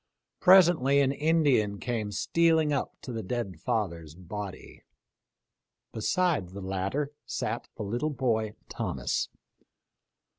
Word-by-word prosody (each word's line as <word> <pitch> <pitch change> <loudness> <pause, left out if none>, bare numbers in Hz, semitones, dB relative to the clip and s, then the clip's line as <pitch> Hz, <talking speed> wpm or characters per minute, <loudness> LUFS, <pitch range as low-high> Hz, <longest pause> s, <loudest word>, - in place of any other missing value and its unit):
Presently 175 -7 +6
an 135 -1 +3
Indian 140 -9 +2
came 115 -4 -2
stealing 160 +4 +2
up 140 - -2
to 130 - -6
the 115 - -3
dead 100 -4 -4
father's 85 -9 -2
body. 95 +2 -8 1.1
Beside 155 - +1
the 100 +2 -8
latter 95 +10 -2 0.2
sat - - -3
the - - -4
little 120 +9 -1
boy 115 -7 -1
Thomas. 60 -1 -2
120 Hz, 110 wpm, -28 LUFS, 100-150 Hz, 1.1 s, Presently